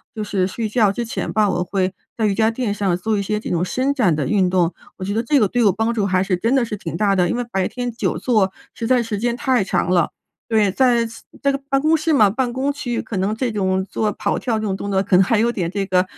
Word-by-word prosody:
就 215 - -3
是 190 -3 0
睡 220 +3 -3
觉 215 -2 +3
之 235 +4 -3
前 225 - -4
吧， 210 -2 +3
我 180 -1 0
会 185 0 -1 0.3
在 225 - +1
瑜 200 - +1
伽 220 0 +3
垫 230 -3 -2
上 195 -3 0
做 215 +3 -1
一 - - 0
些 210 +2 -1
这 - - -6
种 175 0 0
伸 260 +8 0
展 215 - +2
的 145 -2 -2
运 195 -4 +2
动， 180 -2 +1 0.2
我 190 - -6
觉 200 +2 -2
得 225 - +1
这 285 +5 +2
个 210 - +3
对 245 - 0
我 200 - +6
帮 225 +4 -1
助 215 -4 0
还 185 -1 +2
是 185 -2 0
真 230 +7 0
的 265 - +3
是 215 -2 -4
挺 170 -5 -6
大 200 +2 +2
的， 180 -2 +2
因 - - 0
为 245 - -1
白 190 -3 0
天 245 -1 -4
久 230 - -2
坐， 210 -6 +1 0.2
实 230 - -4
在 255 -1 +3
时 220 -2 -3
间 235 +3 -1
太 260 -5 +1
长 180 - 0
了。 175 -3 +2 0.4
对， 215 -3 +3
在 240 +2 +3 0.4
在 280 -1 +2 0.2
办 275 - +3
公 310 +2 +3
室 320 +1 0
嘛， 215 -9 +5
办 245 +4 -1
公 270 +3 -1
区 245 -5 -3
可 225 - -7
能 195 +3 0
这 240 +2 -1
种 190 -2 0
做 215 -1 0
跑 - - -2
跳 225 -4 -1
这 215 - -3
种 195 -2 -1
动 200 +1 -5
作 190 -1 +2
可 195 -1 +1
能 190 - +6
还 220 +3 +1
有 235 +2 +3
点 180 -7 -2
这 195 0 -2
个 185 -1 +2
210 Hz, 305 characters per minute, -20 LUFS, 190-240 Hz, 0.4 s, 我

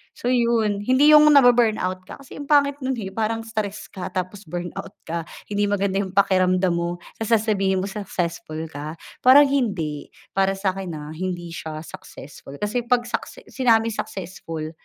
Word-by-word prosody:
So 245 - -2
'yon 235 -4 +2
hindi 265 +6 +5
'yong 300 0 +8
nabu-burnout 235 -9 +4
ka, 275 - -10
kasi 270 - -11
ang 285 - -7
pangit 285 -1 +3
no'n, 260 -1 -2
eh, 195 -4 -5
parang 225 +2 -2
stress 215 -2 -5
ka 185 - -6
tapos 185 +1 -4
burnout 175 +1 -6
ka 165 0 -4 0.2
hindi 205 0 +1
maganda 200 -1 0
'yong 190 -1 -4
pakiramdam 185 -2 +3
mo, 170 0 -2 0.2
tapos 225 +1 -3
sasabihin 195 -3 +1
mo - - -3
successful 170 -5 -4
ka 150 +3 -6 0.2
parang 265 +3 +8
hindi, 195 - -1 0.2
para 195 0 +1
sa 195 -1 0
akin, 190 -2 -6
ha. 150 0 -7
Hindi 175 0 -4
siya 155 -1 -6
successful 140 -3 -11
kasi 235 +3 -2
'pag 245 -1 +3
succe - - -5
sinabing 230 -3 +3
successful, 165 -6 -6
200 Hz, 165 wpm, -23 LUFS, 180-235 Hz, 0.2 s, yong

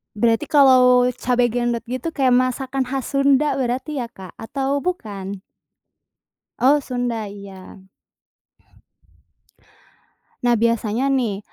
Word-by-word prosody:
Berarti 230 +6 +1
kalau 255 -3 +5
cabe 245 -1 +1
gendot 240 0 -1
gitu 255 +6 -4
kayak 255 -3 +3
masakan 255 +1 -1
khas 265 0 -4
Sunda 280 0 +3
berarti 260 +4 -2
ya 245 - -2
Kak, 190 -6 -13
atau 275 +4 -2
bukan? 200 - -5 1.2
Oh 285 +3 +4
Sunda, 245 -4 -3
iya. 195 -1 -12 2.6
Nah 240 -2 +2
biasanya 230 +2 0
nih, 240 -8 0
250 Hz, 105 wpm, -21 LUFS, 225-270 Hz, 2.6 s, kalau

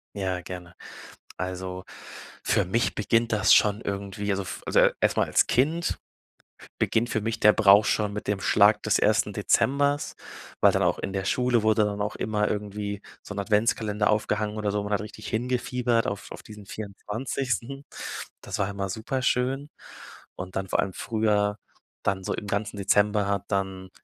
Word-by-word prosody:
Ja, 95 -2 -2
gerne. 90 -1 -9 0.6
Also, 90 0 -5 0.6
für 105 -3 +2
mich 115 +6 0
beginnt 115 +2 +1
das 105 0 +4
schon 105 +1 +4
irgendwie, 100 +1 -4
also 100 0 0
f - - -7
also, - - +3
e - - +5
erst - - +2
mal - - +3
als - - +3
Kind 155 +7 +1 0.8
beginnt 120 +2 +1
für 110 - 0
mich 115 +1 -3
der 105 - +7
Brauch 105 0 +6
schon 105 -1 +1
mit 105 - -5
dem 100 -2 0
Schlag 105 +2 +4
des 110 - +3
1. 105 -1 +2
Dezembers, 140 +7 +1 0.5
weil - - +7
dann - - +1
auch - - +2
in 95 - -4
der 95 -1 -2
Schule 125 +1 +2
wurde 110 -1 +3
dann 105 0 -2
auch 105 - -2
immer 105 -1 0
irgendwie 105 0 -4 0.2
so 105 - -8
'n 100 - -2
Adventskalender 105 0 +1
aufgehangen 105 0 0
oder 105 -1 -1
so. 105 0 -1
Man 105 0 -4
hat 105 - +2
richtig 105 0 -9
hingefiebert 120 0 0
auf 100 - -4
auf - - -9
diesen 105 -1 -11
24. 120 +6 -4 0.6
Das - - -5
war 100 - +1
immer 100 -1 -3
super 110 +7 -3
schön 130 +3 0 0.7
und 90 0 -7
dann 95 -1 -2
vor - - 0
allem 95 - -3
früher 105 -2 0 0.5
dann 95 -1 0
so - - -2
im 105 - -5
ganzen 100 0 -2
Dezember 105 +1 +2
hat 100 -1 -1
dann 95 -1 -2
105 Hz, 175 wpm, -26 LUFS, 100-110 Hz, 0.8 s, der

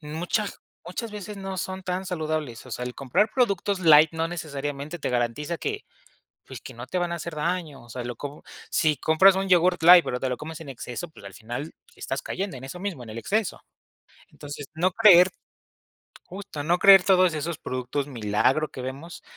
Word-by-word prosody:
Muchas 170 +7 -3 0.3
muchas 225 +5 -5
veces 210 0 -7
no 195 -1 -5
son 190 +1 -4
tan 185 +1 -3
saludables, 155 -8 -4
o - - -12
sea, 125 - -4
el 125 - -6
comprar 140 - +1
productos 200 -5 +1
light 155 -2 +7
no 165 0 -1
necesariamente 145 -1 -5
te - - -3
garantiza 125 +7 -1
que, - - -4 0.6
pues, - - -9
que - - -10
no 120 +2 -9
te 180 - -3
van 175 -1 -1
a - - -1
hacer 170 -1 -6
daño, 150 -4 -3
o 120 - -18
sea, 125 +2 -6
lo 120 0 -5
co 145 +1 -8 0.3
si 150 -3 +2
compras 185 +7 +5
un 195 0 -1
yogur 180 0 +4
light, 175 0 +9
pero 125 - -3
te 130 - -2
lo 125 - -2
comes 160 +1 -8
en 145 - -9
exceso, 125 - -6
pues, 155 - -16
al 100 - -10
final, 120 +8 -7 0.2
estás - - -4
cayendo 190 -8 -4
en 125 - -11
eso 135 +7 -8
mismo, 180 -9 -5
en 115 - -11
el 110 - -8
exceso. 210 - -1 0.7
Entonces, 145 -1 -9
no 180 +3 +1
creer 185 -3 +7 1.0
justo, 190 -6 -7
no 170 +4 +2
creer 195 -2 +8
todos 185 -3 +4
esos 155 +1 -3
productos 130 +2 -3
milagro 125 +5 +1
que 130 - -8
vemos 135 +7 -8
160 Hz, 200 wpm, -25 LUFS, 135-185 Hz, 1.0 s, light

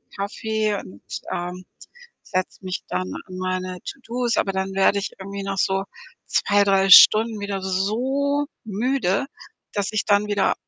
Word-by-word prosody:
Kaffee 215 +1 -2
und, 100 - -12 0.3
ähm, 180 +1 -5 0.6
setze 185 0 -3
mich 185 -1 -4
dann 90 +1 -3
an 185 - -9
meine 185 0 -3
To-dos, 245 -2 -3
aber 195 - +1
dann 190 0 -2
werde 195 +1 +3
ich 200 - -4
irgendwie 195 +1 -6
nach 195 0 -3
so 195 0 +1 0.4
2, 205 0 +3
3 195 -1 +3
Stunden 215 +3 +8
wieder 200 -1 -3
so 255 +10 0 0.2
müde, 220 0 0 0.5
dass 200 -2 -1
ich 215 -2 -1
dann 205 0 +3
wieder 205 -1 +2
200 Hz, 145 wpm, -23 LUFS, 185-215 Hz, 0.6 s, Stunden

